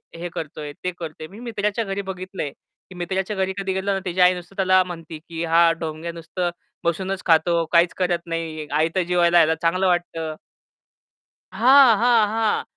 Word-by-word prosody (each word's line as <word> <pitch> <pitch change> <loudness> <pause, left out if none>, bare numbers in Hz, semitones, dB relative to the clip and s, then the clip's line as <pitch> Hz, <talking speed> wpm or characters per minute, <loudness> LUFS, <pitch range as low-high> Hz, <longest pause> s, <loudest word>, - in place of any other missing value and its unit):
हे 175 +1 -5
करतोय, 150 -1 -6
ते 180 - -1
करतोय." 155 -1 -7
मी 200 +7 -13
मित्राच्या 220 -2 -2
घरी 195 +1 -3
बघितलंय. 185 -5 -6 0.4
की 185 - -12
मित्राच्या 190 +3 -2
घरी 190 0 -1
कधी 195 -1 -2
गेलो 190 +1 -1
ना, 195 - -1
तिची 180 +1 -3
आई 180 0 +6
नुसतं 180 +2 -10
त्याला 185 -1 +4
म्हणते, 165 -3 -8
की 165 +1 -6
"हा 165 0 +5
ढोंग्या 160 +1 -5
नुसतं 170 +2 -3 0.3
बसूनच 185 +3 -2
खातो, 165 0 +3
काहीच 170 0 +4
करत 180 -2 +1
नाही. 165 -2 -4
आयतं 160 +5 +1
जेवायला 175 0 +3
यायला, 160 -1 +5
चांगलं 185 +3 +2
वाटतं." 165 -3 -1 1.2
हां, 245 +2 +6
हां, 230 -2 +4
हां, 220 0 0
180 Hz, 170 wpm, -22 LUFS, 165-190 Hz, 1.2 s, आई